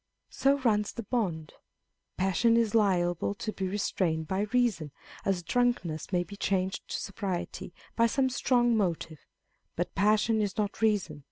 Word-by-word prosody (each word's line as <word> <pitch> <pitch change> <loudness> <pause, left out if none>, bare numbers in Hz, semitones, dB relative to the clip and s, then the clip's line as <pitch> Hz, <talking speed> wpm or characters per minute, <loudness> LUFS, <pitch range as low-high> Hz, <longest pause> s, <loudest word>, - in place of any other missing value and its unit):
" - - -53
So 275 +1 +4
runs 215 -6 +1
the 230 - -5
bond." 180 - -2 0.6
Passion 195 +5 +3
is 230 -2 +1
liable 185 -3 +2
to 215 +1 -4
be 190 - -3
restrained 180 -5 -1
by 195 +4 -1
reason, 235 -11 +1 0.4
as 185 -3 0
drunkenness 195 -9 0
may 180 -2 +2
be 175 +4 -10
changed 190 -2 -1
to - - -3
sobriety 190 -3 -4 0.2
by 230 0 +4
some 265 +3 +1
strong 245 -2 +2
motive: 170 -6 -1 0.6
but 175 - -2
passion 215 +2 +3
is 205 -2 -2
not 210 0 -2
reason, 205 -8 +1
i. - - -13
200 Hz, 160 wpm, -29 LUFS, 175-230 Hz, 0.6 s, So